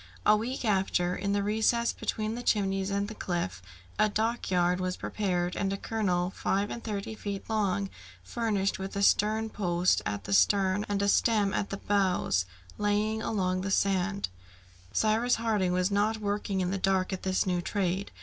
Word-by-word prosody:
A - - +7
week 240 +4 -3
after, 190 -3 +1
in 200 +1 -1
the 200 0 +1
recess 220 +3 +2
between 215 0 -2
the 240 - -4
Chimneys 195 -4 +1
and 200 0 -1
the 220 - -7
cliff, 130 - -3 0.4
a 215 - +4
dockyard 190 -5 +1
was 185 0 -2
prepared, 180 -4 -1
and 195 -1 -1
a 195 - -2
keel 185 -5 -1
five 200 +2 0
and 235 - -6
thirty 210 -1 -4
feet 200 -2 -5
long, 200 -3 0 0.4
furnished 200 - -1
with 190 +1 -5
a 200 - 0
stern 215 +2 +3
post 175 -2 +1
at 100 -1 -3
the 100 - -3
stern 195 - +3
and 200 -1 0
a - - +2
stem 205 -1 +3
at 200 - -1
the 200 - -4
bows, 190 - +1 0.3
lay 210 +1 +1
along 185 -4 -1
the 195 - -3
sand. 195 - +1 0.6
Cyrus 220 - +2
Harding 215 -5 0
was 180 +2 +1
not 210 +2 +2
working 205 -2 -2
in 180 0 0
the 195 - -1
dark 190 0 +1
at 185 - -4
this 185 -1 0
new 180 -2 0
trade. 190 +1 -1
200 Hz, 180 wpm, -29 LUFS, 185-215 Hz, 0.6 s, A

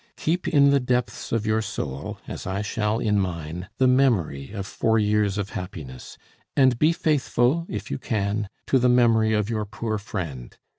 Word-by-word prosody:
Keep 175 +3 -1
in 140 -3 +5
the 140 - +4
depths 125 -1 -2
of 115 -2 0
your 110 0 +2
soul, 70 -9 -5
as - - -6
I 95 +2 -2
shall 105 +1 -1
in 105 -3 +1
mine, 90 0 -4
the 130 - +3
memory 115 - +2
of 100 -3 -5
four 110 +3 +1
years 105 -1 +2
of 100 -1 -3
happiness, 75 -9 -8 0.4
and 130 -3 +4
be 155 +2 +5
faithful, 150 -1 +1
if 105 - -5
you 70 - -2
can, 105 -1 -1 0.2
to 135 - +3
the 125 0 +3
memory 115 -3 +4
of 105 -1 +1
your 110 -2 -1
poor 110 +1 -3
friend. 85 - -6
110 Hz, 180 wpm, -24 LUFS, 95-125 Hz, 0.4 s, in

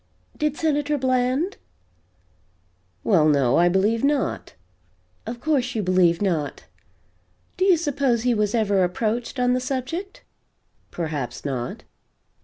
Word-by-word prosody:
"Did 300 -1 -1
Senator 295 -2 0
Blank?" 260 +7 0 1.4
"Well, 160 -7 +4
no 140 -4 +3
I 175 +1 +5
believe 205 +6 +1
not." 285 -1 -1 0.7
"Of 235 +1 -5
course 260 -3 0
you 215 - 0
believe 180 -1 +3
not. 160 -7 -2 0.9
Do 370 - +1
you 375 -3 +5
suppose 275 -7 0
he 250 -1 +2
was 210 0 0
ever 200 -4 +2
approached, 225 +8 -2
on 250 0 +3
the 255 - +1
subject?" 275 +9 -4 0.7
"Perhaps 155 -8 -4
not." 125 -4 -4
235 Hz, 120 wpm, -23 LUFS, 180-275 Hz, 1.4 s, I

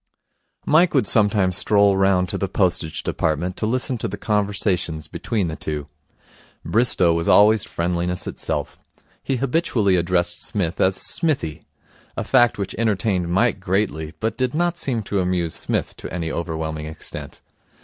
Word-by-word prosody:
Mike 165 +2 +4
would 130 -6 +3
sometimes 100 -4 +3
stroll 100 0 +3
round 95 -1 +2
to - - -5
the - - -1
Postage 80 - -1
Department 85 +4 -1
to 110 - -2
listen 125 +1 0
to - - -2
the - - -6
conversations 100 -7 0
between 95 +4 -2
the 80 - -4
two. 75 -2 -4 0.8
Bristow 105 -7 +3
was 85 0 -1
always 105 0 +5
friendliness 90 +1 -2
itself. - - -4 0.4
He 135 - -1
habitually 120 - +1
addressed 85 0 0
Psmith 90 -5 -2
as 95 0 +3
Smithy, 145 - 0 0.6
a - - -1
fact 120 -2 +3
which 100 -2 -4
entertained 100 -5 0
Mike 100 +4 +2
greatly 90 -5 -2
but 110 +3 -2
did 130 +1 0
not 175 +1 +1
seem 120 -7 -2
to 100 0 -2
amuse 90 -3 -1
Psmith - - -3
to - - -8
any 80 -2 -3
overwhelming 80 -2 -4
extent. 80 0 -8
95 Hz, 150 wpm, -22 LUFS, 85-110 Hz, 0.8 s, always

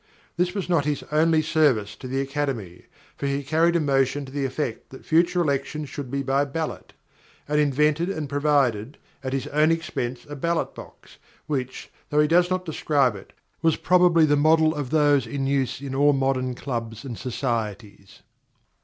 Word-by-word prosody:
This 180 +2 0
was 195 -4 -3
not 165 -5 +2
his 150 -1 -1
only 155 +1 +3
service 130 -11 +2
to 130 - -8
the 135 +2 -1
Academy, 135 - -4 0.3
for 140 - -3
he 140 +1 -1
carried 160 +4 +2
a - - +4
motion 140 -1 +1
to 130 - -11
the 140 0 -2
effect 130 -3 -4
that 130 - -13
future 175 +2 +3
elections 145 0 -2
should 140 -2 -6
be 140 +1 -2
by 135 +1 +1
ballot; 155 +3 -5 0.5
and 150 +1 +1
invented 150 +4 +2
and 155 -6 -3
provided, 140 -5 +1 0.3
at 130 - -3
his 135 -1 -2
own 155 +2 +3
expense, 125 -7 -3
a 145 - -7
ballot 170 +4 -1
box - - -13 0.3
which, 130 -4 -4 0.2
though 150 - +1
he 150 - +4
does 175 +3 +3
not 185 0 -1
describe 145 - +1
it, 95 - -12 0.3
was 165 -1 +3
probably 175 -2 +4
the 145 -1 +3
model 155 +2 +4
of 145 -5 -4
those 145 -4 +3
in 135 +3 -3
use 135 -2 0
in 140 -2 -5
all 145 +2 +4
modern 135 -2 0
clubs 115 -3 -5
and 120 -5 -6
societies. 110 -6 -4
145 Hz, 180 wpm, -24 LUFS, 130-155 Hz, 0.5 s, a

